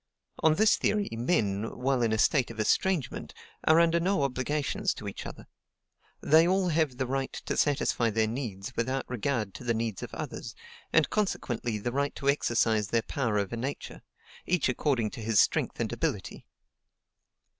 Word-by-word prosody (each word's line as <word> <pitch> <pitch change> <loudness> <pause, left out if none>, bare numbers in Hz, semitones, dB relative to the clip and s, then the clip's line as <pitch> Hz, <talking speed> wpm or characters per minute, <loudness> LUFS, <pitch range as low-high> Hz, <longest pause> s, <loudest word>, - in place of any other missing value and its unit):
On 160 -1 +4
this 215 +4 +4
theory, 210 -1 0
men, 115 - -1
while 130 0 +1
in 115 -2 +2
a 110 - +1
state 125 +4 +3
of 115 -1 -9
ESTRANGEMENT, 155 - 0 0.3
are 160 +1 +6
under 170 0 +4
no 180 -3 +1
obligations 145 +9 -1
to 105 - -8
each 100 - -6
other; - - -10 0.8
they 160 +3 +5
all 185 0 +2
have 155 -6 +1
the 130 - 0
right 135 +1 -2
to - - -4
satisfy 135 -5 +1
their 110 0 +1
needs 115 -1 -5
without 130 +3 -1
regard 120 -4 -2
to - - -9
the 120 -1 0
needs 110 -3 -2
of - - -6
others, - - -6 0.4
and 155 -1 +3
consequently 120 - -1
the 120 +4 -3
right 140 +2 -1
to 140 - -1
exercise 115 -6 +1
their 115 +2 +1
power 115 -6 -1
over 100 +3 -1
Nature, 130 +5 -5 0.5
each 180 -3 +2
according 125 -4 0
to - - -8
his 110 -1 +2
strength - - +2
and - - -1
ability. - - -3
130 Hz, 170 wpm, -29 LUFS, 115-155 Hz, 0.8 s, are